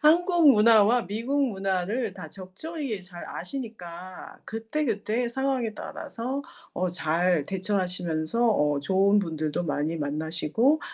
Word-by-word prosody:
한국 335 Hz, 0 st, +5 dB
문화와 225 Hz, 0 st, +5 dB
미국 235 Hz, +9 st, 0 dB
문화를 195 Hz, +3 st, -1 dB
다 170 Hz, -5 st, -8 dB
적절히 220 Hz, -, -5 dB
잘 175 Hz, -1 st, -10 dB
아시니까 185 Hz, -5 st, -7 dB
그때그때 225 Hz, -1 st, -1 dB
상황에 260 Hz, -3 st, -1 dB
따라서 250 Hz, +6 st, -5 dB, 0.3 s
어 185 Hz, -, -1 dB
잘 170 Hz, -1 st, +1 dB
대처하시면서 185 Hz, +1 st, 0 dB
어 150 Hz, -8 st, +2 dB
좋은 195 Hz, +6 st, +3 dB
분들도 160 Hz, -4 st, -1 dB
많이 155 Hz, +1 st, -1 dB
만나시고 160 Hz, -, +1 dB
200 Hz, 270 characters per minute, -27 LUFS, 175-240 Hz, 0.3 s, 한국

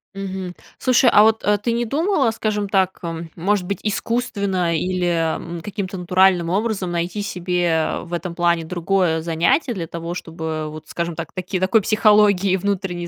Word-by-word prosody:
Мгм. 190 Hz, -2 st, -5 dB, 0.2 s
Слушай, 255 Hz, -1 st, +4 dB
а 210 Hz, -, +7 dB
вот, 220 Hz, 0 st, +3 dB
э, 210 Hz, 0 st, +3 dB
ты 230 Hz, +4 st, -1 dB
не 235 Hz, +1 st, 0 dB
думала, 285 Hz, -, +1 dB
скажем 210 Hz, -2 st, -2 dB
так, 190 Hz, -1 st, +1 dB
эм, 165 Hz, -1 st, -5 dB
может 190 Hz, +2 st, 0 dB
быть, 200 Hz, +2 st, -3 dB
искусственно 200 Hz, -5 st, -1 dB
или, 180 Hz, +2 st, -1 dB, 0.3 s
м, 170 Hz, 0 st, -7 dB
каким-то 195 Hz, +1 st, -5 dB
натуральным 180 Hz, -1 st, +3 dB
образом 195 Hz, -1 st, -1 dB
найти 175 Hz, +4 st, -2 dB
себе 175 Hz, -4 st, 0 dB
в 175 Hz, -, -10 dB
этом 175 Hz, 0 st, -3 dB
плане 170 Hz, -1 st, +1 dB
другое 175 Hz, 0 st, 0 dB
занятие 170 Hz, -, +1 dB
для 175 Hz, -6 st, -5 dB
того, 170 Hz, +1 st, -5 dB
чтобы 160 Hz, -3 st, -5 dB
вот, 155 Hz, 0 st, -10 dB
скажем 170 Hz, -1 st, -3 dB
так, 165 Hz, 0 st, -6 dB
таки 185 Hz, 0 st, -3 dB
такой 190 Hz, +4 st, +3 dB
психологией 205 Hz, -2 st, +4 dB
внутренней 185 Hz, -2 st, -2 dB
185 Hz, 165 wpm, -21 LUFS, 170-205 Hz, 0.3 s, а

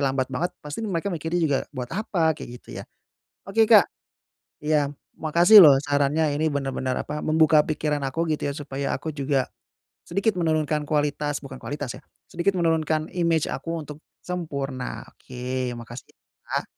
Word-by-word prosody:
lambat 135 Hz, -1 st, 0 dB
banget. 170 Hz, +8 st, -1 dB
Pasti 150 Hz, +7 st, -5 dB
nih 220 Hz, -, -3 dB
mereka 185 Hz, +2 st, -2 dB
mikirnya 165 Hz, +1 st, -2 dB
juga, 145 Hz, -4 st, +2 dB
"Buat 125 Hz, -3 st, -6 dB
apa?" 175 Hz, -6 st, +1 dB
Kayak 150 Hz, -, -9 dB
gitu -, -, -8 dB
ya? -, -, -9 dB, 0.6 s
Oke, 220 Hz, +2 st, +3 dB
Kak. 215 Hz, -4 st, +6 dB, 0.7 s
Iya. 150 Hz, -2 st, +2 dB, 0.3 s
Makasih 170 Hz, +7 st, +7 dB
loh 145 Hz, -4 st, +9 dB
sarannya. 145 Hz, +1 st, +1 dB
Ini 155 Hz, +2 st, 0 dB
benar-benar, 135 Hz, -2 st, -2 dB
apa, 150 Hz, 0 st, -4 dB
membuka 155 Hz, -1 st, +4 dB
pikiran 150 Hz, -1 st, -1 dB
aku 165 Hz, +5 st, -2 dB
gitu 150 Hz, -1 st, -2 dB
ya -, -, -5 dB
supaya 140 Hz, -2 st, -4 dB
aku 155 Hz, +3 st, -4 dB
juga 140 Hz, -2 st, 0 dB, 0.6 s
sedikit 195 Hz, +3 st, 0 dB
menurunkan 155 Hz, -3 st, 0 dB
kualitas, 145 Hz, 0 st, -1 dB
bukan 135 Hz, -2 st, -9 dB
kualitas 145 Hz, -1 st, -5 dB
ya, -, -, -18 dB, 0.3 s
sedikit 175 Hz, +3 st, 0 dB
menurunkan 160 Hz, -2 st, +1 dB
imej 170 Hz, -3 st, +1 dB
aku 165 Hz, 0 st, -4 dB
untuk 150 Hz, -1 st, -9 dB, 0.2 s
sempurna. 140 Hz, -7 st, -4 dB
Oke, 125 Hz, 0 st, -5 dB
makasih 120 Hz, +1 st, -9 dB
ya, -, -, -63 dB, 0.4 s
Kak. -, -, -11 dB
150 Hz, 160 wpm, -24 LUFS, 140-165 Hz, 0.7 s, loh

